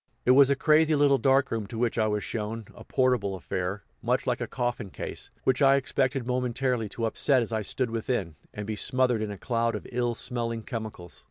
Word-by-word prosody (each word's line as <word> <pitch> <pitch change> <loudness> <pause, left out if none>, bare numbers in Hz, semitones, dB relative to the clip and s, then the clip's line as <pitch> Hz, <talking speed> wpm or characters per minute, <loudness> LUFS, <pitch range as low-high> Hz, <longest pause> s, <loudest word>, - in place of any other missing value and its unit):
It 125 - +6
was 135 +1 +7
a 140 - +3
crazy 155 +2 +4
little 140 -2 +4
dark 135 0 +3
room 110 -3 -2
to 115 - -7
which 120 0 0
I 110 - +3
was 105 -1 -1
shown 110 0 -4
a - - -12
portable 125 -7 +1
affair, 95 +2 -3 0.2
much - - 0
like - - -1
a - - -2
coffin 120 -4 -2
case, - - -7
which 130 +2 +2
I 135 0 +6
expected 135 -1 0
momentarily 125 -2 -1
to 115 - 0
upset 130 +3 +2
as 115 - -6
I 110 - 0
stood 120 +3 -2
within, 115 - -2 0.2
and 105 - -6
be 110 +1 -3
smothered 125 +1 +1
in 110 - -2
a 100 - -6
cloud 115 +2 0
of - - -6
ill 120 -1 0
smelling 115 -2 -3
chemicals. 105 - -7
120 Hz, 210 wpm, -27 LUFS, 110-130 Hz, 0.2 s, was